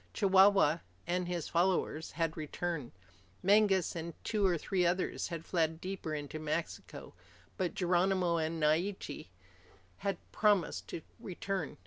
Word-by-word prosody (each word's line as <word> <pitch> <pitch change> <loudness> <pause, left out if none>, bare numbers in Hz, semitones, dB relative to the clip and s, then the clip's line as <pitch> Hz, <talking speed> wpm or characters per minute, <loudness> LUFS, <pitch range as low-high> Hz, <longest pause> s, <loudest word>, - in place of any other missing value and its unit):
Chihuahua 195 -5 +5 0.3
and 180 +1 -1
his 175 -3 -2
followers 170 -2 0
had 165 -1 -1
returned. 155 -2 -4 0.5
Mangas 195 -2 +4
and 170 0 -5
two 215 -2 0
or 175 -2 +2
three 180 +3 0
others 175 +2 0
had 165 -2 -6
fled 160 -2 0
deeper 185 -4 -4
into 145 +1 -5
Mexico, 155 +2 -4 0.4
but 185 -4 -2
Geronimo 180 -1 +2
and 160 0 -1
Naiche 160 - 0 0.7
had 195 -2 -2
promised 205 -5 +2
to 160 - -6 0.2
return. 190 -3 -4
175 Hz, 125 wpm, -33 LUFS, 160-190 Hz, 0.7 s, Chihuahua